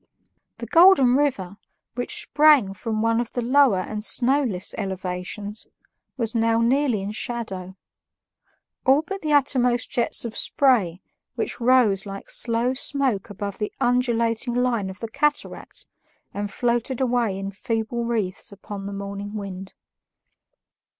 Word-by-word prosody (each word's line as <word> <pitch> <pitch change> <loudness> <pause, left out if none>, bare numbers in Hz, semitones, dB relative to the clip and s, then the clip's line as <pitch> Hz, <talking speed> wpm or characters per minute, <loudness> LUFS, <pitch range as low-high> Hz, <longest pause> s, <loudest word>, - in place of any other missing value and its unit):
The - - -6
Golden 330 -8 +6
River, 205 -10 0 0.4
which 420 - -2
sprang 295 - +4
from 220 +2 -3
one 230 +1 +2
of 235 - -7
the 245 - -2
lower 255 -6 +4
and 210 +2 -5
snowless 245 -6 +2
elevations, 190 +1 -4 0.5
was 230 -3 -1
now 230 0 +2
nearly 240 -3 +2
in 200 - -4
shadow 195 -5 -5 1.1
all 270 +4 +4
but 390 +4 -6
the 310 - -2
uppermost 250 -4 +2
jets 240 0 -1
of 230 - -5
spray, 210 -11 +2 0.3
which - - -3
rose 230 -6 +3
like 195 0 -8
slow 235 +2 0
smoke 265 -6 -1
above 200 0 -6
the 210 - -2
undulating 240 -1 +1
line 240 -6 0
of 190 +1 -10
the 230 - -3
cataract 295 +6 -2 0.5
and 205 0 -3
floated 240 +2 -1
away 240 -6 +1
in 195 0 -4
feeble 225 +2 -3
wreaths 215 -6 -2
upon 200 0 -8
the 200 - -5
morning 200 +1 -6
wind. 195 -2 -7
230 Hz, 135 wpm, -23 LUFS, 200-250 Hz, 1.1 s, Golden